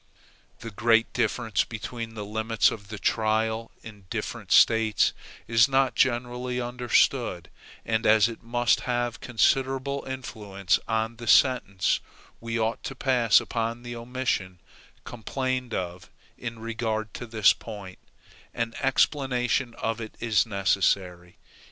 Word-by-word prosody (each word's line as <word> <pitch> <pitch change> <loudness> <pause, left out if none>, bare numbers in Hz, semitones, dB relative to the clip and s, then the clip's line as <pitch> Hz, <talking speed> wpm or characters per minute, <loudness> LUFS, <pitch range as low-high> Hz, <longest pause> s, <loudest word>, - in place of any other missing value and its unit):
The 115 - -7
great 115 +2 +2
difference 115 -4 0
between 115 0 -7
the 105 -2 -5
limits 110 +1 +1
of 100 -2 -8
the 110 +1 -7
jury - - +1
trial 110 +1 0
in 105 -4 -12
different - - -5
States 110 -1 +4 0.3
is 115 +3 +4
not 135 -1 +2
generally 125 0 0
understood; 120 -1 0 0.3
and 110 0 0
as 110 0 +6
it 115 -1 -8
must 120 -1 +1
have 120 -2 -1
considerable 135 +3 0
influence 105 -7 -2
on 110 0 -1
the 120 -1 -9
sentence 105 -8 +3 0.4
we 115 0 -3
ought 110 +1 -1
to 135 - -5
pass 125 -5 +4
upon 115 +1 -3
the 120 0 -6
omission 115 -7 -3 0.4
complained 125 +1 -3
of 90 -1 -5 0.3
in 115 -1 -6
regard 110 -1 -3
to 120 - -7
this 110 -2 +4
point, 95 -3 -10 0.6
an 115 -1 -2
explanation 130 -3 +1
of 115 +1 -3
it 110 - -8
is 115 -2 +2
necessary. 95 -3 0
115 Hz, 130 wpm, -26 LUFS, 110-125 Hz, 0.6 s, as